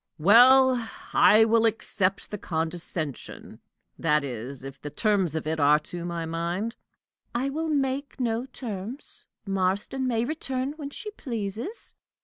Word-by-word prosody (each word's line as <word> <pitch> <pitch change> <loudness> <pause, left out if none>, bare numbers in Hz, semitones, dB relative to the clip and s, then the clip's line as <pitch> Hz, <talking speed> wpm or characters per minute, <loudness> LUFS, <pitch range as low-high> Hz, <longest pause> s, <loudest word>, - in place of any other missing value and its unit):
"Well, 245 +6 +6 0.2
I 220 +1 +7
will 230 0 +4
accept 195 -3 0
the 210 - -4
condescension 160 -3 -4 0.4
that 150 -2 +2
is, 130 +1 -5
if 135 0 -9
the 145 - -5
terms 190 0 +1
of 160 - -2
it 160 +1 -1
are 145 +1 +6
to 170 +3 -6
my 170 -1 -3
mind." 170 +8 -2 0.6
"I 265 +3 0
will 320 +3 -2
make 280 -1 -1
no 235 0 -1
terms. 235 0 -6 0.2
Marston 195 +7 0
may 230 -2 +1
return 265 -2 -2
when 295 -2 -7
she 425 +8 -7
pleases." 235 - -4
215 Hz, 135 wpm, -26 LUFS, 165-260 Hz, 0.6 s, I